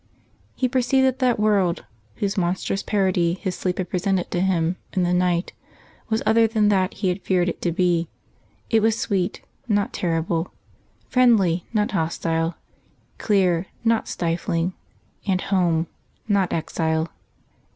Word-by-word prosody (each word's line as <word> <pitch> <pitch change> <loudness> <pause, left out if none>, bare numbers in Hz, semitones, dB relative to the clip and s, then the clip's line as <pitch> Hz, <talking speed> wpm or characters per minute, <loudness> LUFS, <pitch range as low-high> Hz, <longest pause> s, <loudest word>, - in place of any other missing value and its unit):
He 255 - +1
perceived 260 +1 +2
that 260 0 +1
that 250 -4 +2
world, 200 -5 +2 0.3
whose 200 -1 -2
monstrous 185 +1 -1
parody 185 -4 +1
his 185 -1 -3
sleep 180 0 -2
had 185 -2 -3
presented 185 0 0
to 175 - 0
him 180 -2 +1 0.2
in 185 - +1
the 175 0 +1
night, 180 -1 +1 0.6
was 220 0 0
other 225 0 +5
than 215 -2 +2
that 190 -2 +1
he 195 -3 0
had 180 +2 -2
feared 180 -2 +1
it 175 - -3
to 175 - 0
be; 175 -1 +1 0.6
it 225 -1 +4
was 225 0 +2
sweet, 190 -4 -1 0.2
not 205 -3 +1
terrible; 165 0 -1 0.6
friendly, 210 -9 +3
not 210 -2 +1
hostile; 165 -1 -1 0.6
clear, 185 -4 +2 0.2
not 230 -1 +2
stifling; 170 +1 -1 0.5
and 185 -2 +2
home, 175 -4 +1 0.4
not 200 -4 +2
exile. 160 0 -1
185 Hz, 140 wpm, -23 LUFS, 170-210 Hz, 0.6 s, other